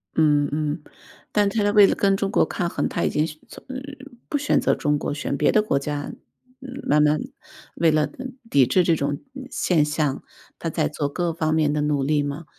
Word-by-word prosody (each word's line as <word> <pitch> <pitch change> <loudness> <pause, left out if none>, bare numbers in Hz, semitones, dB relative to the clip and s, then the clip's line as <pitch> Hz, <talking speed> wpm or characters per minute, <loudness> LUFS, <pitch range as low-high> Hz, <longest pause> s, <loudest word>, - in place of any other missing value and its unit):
嗯 150 -2 +3
嗯， 150 +1 -2 0.5
但 205 -1 +2
是 215 0 0
它 205 - +2
为 205 -1 +7
了 - - +3
跟 195 -1 +2
中 195 0 -1
国 - - +3
抗 175 - -2
衡， - - -1
它 170 - -2
已 - - +2
经 150 +1 +1
选 155 -1 -9
从 - - -13
呃， 260 - -6 0.5
不 290 - 0
选 290 +1 +2
择 - - +2
中 145 0 0
国， 145 - -3
选 145 -1 -3
别 150 - +3
的 215 - +4
国 210 - 0
家， 145 +1 -3 0.5
嗯， 265 +1 -8
慢 150 +1 +3
慢 150 0 +3 0.6
为 165 -1 +3
了 155 -1 +1 0.4
抵 140 - +5
制 180 +9 +3
这 170 -1 +3
种 140 -1 -2 0.3
现 160 -5 +2
象， 150 -2 -1 0.3
它 - - -3
在 - - 0
做 145 - -2
各 175 +3 -1
方 155 -1 0
面 155 -2 +2
的 150 0 0
努 145 -2 0
力 145 +1 +1
嘛。 145 +3 -5
155 Hz, 235 characters per minute, -23 LUFS, 145-180 Hz, 0.6 s, 为